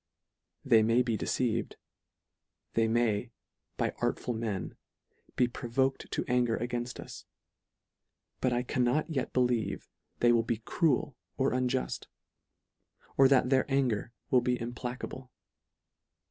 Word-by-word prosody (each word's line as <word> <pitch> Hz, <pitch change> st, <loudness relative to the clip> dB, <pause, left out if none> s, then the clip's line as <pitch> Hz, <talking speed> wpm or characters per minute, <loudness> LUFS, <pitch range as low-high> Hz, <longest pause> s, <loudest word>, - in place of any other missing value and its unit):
They 110 Hz, -, +6 dB
may 115 Hz, +3 st, +3 dB
be 115 Hz, -2 st, 0 dB
deceived: 115 Hz, +1 st, -1 dB, 1.0 s
they 115 Hz, -1 st, +3 dB
may, 115 Hz, -1 st, +1 dB, 0.5 s
by -, -, 0 dB
artful 120 Hz, -, -1 dB
men, 110 Hz, -5 st, -3 dB, 0.6 s
be 125 Hz, -, +3 dB
provoked 130 Hz, +2 st, -1 dB
to -, -, -1 dB
anger 120 Hz, -2 st, +2 dB
againfi; 120 Hz, +1 st, -3 dB
us; -, -, -10 dB, 1.1 s
but 130 Hz, -, +1 dB
I 120 Hz, 0 st, +1 dB
can 125 Hz, 0 st, 0 dB
not 150 Hz, +7 st, +1 dB
yet 135 Hz, -5 st, -1 dB
believe 125 Hz, -5 st, 0 dB, 0.3 s
they 120 Hz, -, +4 dB
will 120 Hz, -1 st, +4 dB
be 115 Hz, 0 st, -1 dB
cruel 145 Hz, +4 st, 0 dB, 0.2 s
or 135 Hz, -1 st, +2 dB
unjuft; 125 Hz, 0 st, -1 dB, 1.1 s
or 135 Hz, -, +7 dB
that 130 Hz, -1 st, +3 dB
their 135 Hz, +1 st, +2 dB
anger 125 Hz, -5 st, +1 dB, 0.2 s
will 125 Hz, -, +5 dB
be 125 Hz, 0 st, 0 dB
implacable. 125 Hz, +2 st, -5 dB
125 Hz, 125 wpm, -30 LUFS, 115-130 Hz, 1.1 s, or